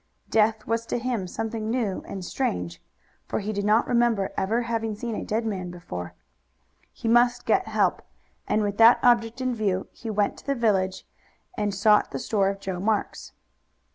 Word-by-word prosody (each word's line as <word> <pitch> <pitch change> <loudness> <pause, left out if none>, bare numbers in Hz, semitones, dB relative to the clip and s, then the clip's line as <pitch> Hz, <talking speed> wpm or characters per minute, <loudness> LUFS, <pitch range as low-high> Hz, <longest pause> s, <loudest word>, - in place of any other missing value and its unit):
Death 220 0 +2
was 230 0 -1
to - - -1
him 235 -6 -2
something 220 +2 -4
new 225 -5 -1
and 190 -2 -6
strange, 90 - -3 0.5
for - - -2
he 210 +1 -3
did 200 0 -2
not 210 +2 +3
remember 235 -5 +1
ever 225 +5 0
having 225 -2 -2
seen 230 +2 -4
a - - -3
dead 225 +2 -1
man 190 -5 -3
before. 90 - -7 0.8
He - - -6
must 240 +1 +3
get - - +2
help, - - +1 0.5
and 215 - +1
with 205 -1 -2
that 230 +2 +8
object 235 0 +3
in 255 -1 0
view 200 -5 -1
he 230 - -8
went 205 -1 0
to - - -15
the 280 - +1
village, 195 -6 0 0.5
and 205 -1 -1
sought 210 +2 +4
the - - -4
store 205 -5 +1
of 195 0 -4
Joe 190 -2 -4
Marks. 210 +2 -2
215 Hz, 180 wpm, -25 LUFS, 195-230 Hz, 0.8 s, that